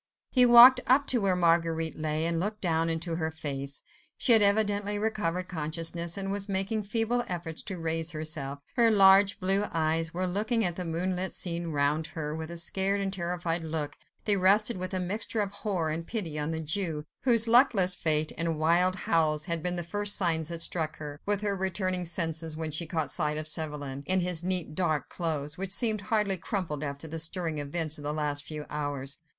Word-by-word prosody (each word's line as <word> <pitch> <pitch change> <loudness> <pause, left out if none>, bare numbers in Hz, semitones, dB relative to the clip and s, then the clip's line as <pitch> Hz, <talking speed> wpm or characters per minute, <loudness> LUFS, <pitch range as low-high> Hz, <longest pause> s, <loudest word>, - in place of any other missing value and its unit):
He 250 -2 +6
walked 245 +2 +9
up 270 +3 +4
to 245 -3 +2
where 195 -2 +2
Marguerite 165 -2 0
lay, 155 +1 -1
and 165 0 -1
looked 210 +4 -3
down 165 -3 0
into 165 0 -3
her 160 -2 -2
face. 140 -3 -6 0.3
She 245 - +6
had 220 - +8
evidently 205 0 +1
recovered 185 -5 -2
consciousness, 165 +1 -2
and 195 0 -3
was 200 0 -1
making 195 +2 -1
feeble 230 +3 0
efforts 170 -3 -3
to 190 -3 -5
raise 165 0 -1
herself. 155 -3 -3 0.2
Her 235 -1 +5
large, 195 -1 +5
blue 195 +2 +1
eyes 165 0 -1
were 180 +2 -3
looking 215 +5 0
at 175 -2 -1
the 180 - -5
moonlit 180 +3 -2
scene 170 -1 -2
round 150 +1 -1
her 150 -1 -5
with 160 0 -6
a 170 - -7
scared 190 +4 +1
and 195 -1 -3
terrified 175 -2 -3
look; 155 -2 -4 0.3
they 210 - +4
rested 200 +4 +3
with 185 0 -5
a - - -1
mixture 205 +5 -1
of 200 -2 -1
horror 190 -6 -3
and 165 +2 -5
pity 170 -10 -4
on 150 +1 -2
the 160 0 -3
Jew, 155 -1 -1 0.2
whose 235 -3 +3
luckless 225 -7 +5
fate 155 -2 +1
and 165 -1 -1
wild 170 +4 +2
howls 155 -4 +1
had 170 -3 0
been 180 +2 -1
the 175 - -3
first 205 +4 0
signs 165 -5 0
that 170 0 -1
struck 160 -3 0
her, 145 -1 -8
with 205 -1 +1
her 205 -1 -1
returning 185 -1 -2
senses; 165 -2 0
then 160 0 -4
she 160 +2 0
caught 160 -4 -1
sight 150 0 0
of 155 0 -4
Chauvelin, 150 -4 -4
in 185 0 +4
his 180 -2 +1
neat, 180 -4 0
dark 155 -3 -1
clothes, 155 -1 -4
which 195 0 -4
seemed 215 +1 +2
hardly 205 -2 0
crumpled 170 - -4
after 140 +2 -5
the 160 +1 -6
stirring 165 -1 -2
events 155 +1 -2
of - - -10
the 145 - -2
last 150 -1 -2
few 150 -1 -7
hours. 145 -2 -4
170 Hz, 200 wpm, -28 LUFS, 155-195 Hz, 0.3 s, walked